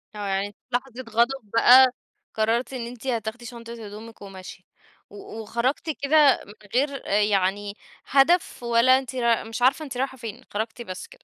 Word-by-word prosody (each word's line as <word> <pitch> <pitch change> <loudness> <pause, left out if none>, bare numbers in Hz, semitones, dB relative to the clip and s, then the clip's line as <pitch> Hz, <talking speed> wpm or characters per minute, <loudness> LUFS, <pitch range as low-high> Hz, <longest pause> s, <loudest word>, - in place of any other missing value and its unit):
آه، 205 -1 -4
يعني 195 +1 -1
في - - -36
لحظة 250 0 -2 0.2
غضب 235 0 0
بقى، 255 +2 +7 0.4
قررتِ 230 +4 0
إن 235 -2 -4
أنتِ 245 +2 -10
هتاخدي 235 0 -3
شنطة 230 -1 -9
هدومِك 215 +2 -11
وماشية، 190 -2 -10 0.5
و 205 +2 -9
وخرجتِ 240 +8 -2
كده 285 -1 +4
من 205 - -13 0.2
غير 275 0 0
آآ 205 +1 +2
يعني 200 0 0 0.3
هدف، 280 0 +2
ولا 235 +2 +4
أنتِ 260 0 -8
راي 235 -2 +1
مش 225 +1 -7
عارفة 275 +5 +3
أنتِ 260 -3 -7
رايحة 265 0 -2
فين، 225 -4 -8
خرجتِ 220 +3 -4
بس 185 -5 -7
كده. - - -19
235 Hz, 170 wpm, -24 LUFS, 210-260 Hz, 0.5 s, بقى